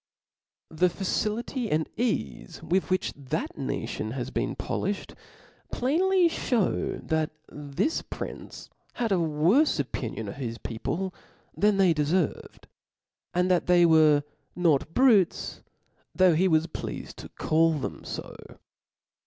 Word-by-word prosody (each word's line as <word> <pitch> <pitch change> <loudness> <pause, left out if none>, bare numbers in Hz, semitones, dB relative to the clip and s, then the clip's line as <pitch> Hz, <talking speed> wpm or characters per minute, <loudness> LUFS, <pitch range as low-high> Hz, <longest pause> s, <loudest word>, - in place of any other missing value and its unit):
The 175 +3 +2
facility 215 +6 -2
and 155 +1 +1
eafe 210 - -3
with 185 +3 0
which 185 0 0
that 135 -3 -4
nation 110 +1 -3
has 130 0 -4
been 120 +3 -2
poliihed, 200 +1 -3 0.6
plainly 355 +8 +3
(hews, 245 - -1
that 160 -1 0 0.2
this 145 - -2
prioce - - -8 0.2
had 235 -3 -2
a 190 - +3
worie 170 - +3
opinion 115 -5 -3
of 100 - -7
his 115 -4 -4
people 175 +13 -4 0.4
than 205 -1 +3
they 190 -3 +5
deferved; 155 +3 -1 0.7
and 180 +1 +2
that 180 - +2
they 175 -1 +6
were 155 -3 +5 0.3
not 165 -4 +2
brutes, 225 -9 +3 0.5
though 185 -2 +5
he 180 +4 +3
was 160 -2 +3
pleafed 170 - -7
tO - - -9
call 165 +1 +3
them 150 - -4
fo. - - -7
175 Hz, 125 wpm, -27 LUFS, 150-200 Hz, 0.7 s, they